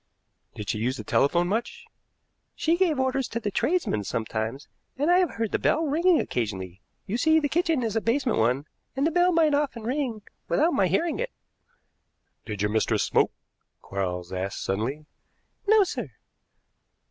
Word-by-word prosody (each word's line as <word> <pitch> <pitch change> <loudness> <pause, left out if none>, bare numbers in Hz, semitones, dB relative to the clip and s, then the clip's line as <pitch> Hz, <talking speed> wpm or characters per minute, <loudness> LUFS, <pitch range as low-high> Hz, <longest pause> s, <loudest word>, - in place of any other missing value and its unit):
"Did 105 - -6
she 105 - -1
use 125 +4 -1
the - - -6
telephone 170 +5 +2
much?" 220 +5 -3 0.7
"She 325 +2 +2
gave 345 -6 +2
orders 260 0 0
to 230 - -3
the 210 -3 -3
tradesmen 300 - 0
sometimes, 110 +6 -3 0.3
and 295 +5 +2
I 360 - +6
have 360 -3 0
heard 225 -2 -2
the - - 0
bell 320 - +2
ringing 330 +4 +3
occasionally. 95 -6 -3 0.2
You 215 - -2
see, 315 +4 +4
the 295 - 0
kitchen 325 -3 +1
is 225 -2 -2
a 225 - +2
basement 240 - +1
one, 125 +5 +1 0.3
and 275 +2 +1
the 325 - +2
bell 355 +2 +4
might 325 -3 +3
often 285 -6 0
ring 245 -3 -2 0.2
without 325 +4 +2
my - - +3
hearing 335 -1 0
it." - - -1 1.2
"Did 105 -2 -3
your 105 - +1
mistress 110 0 +1
smoke?" - - +2 0.5
Quarles 90 -2 -4
asked 95 +1 -3
suddenly. 125 +10 -2 0.6
"No, 430 0 +6
sir." 375 - -4
230 Hz, 170 wpm, -26 LUFS, -, 1.2 s, I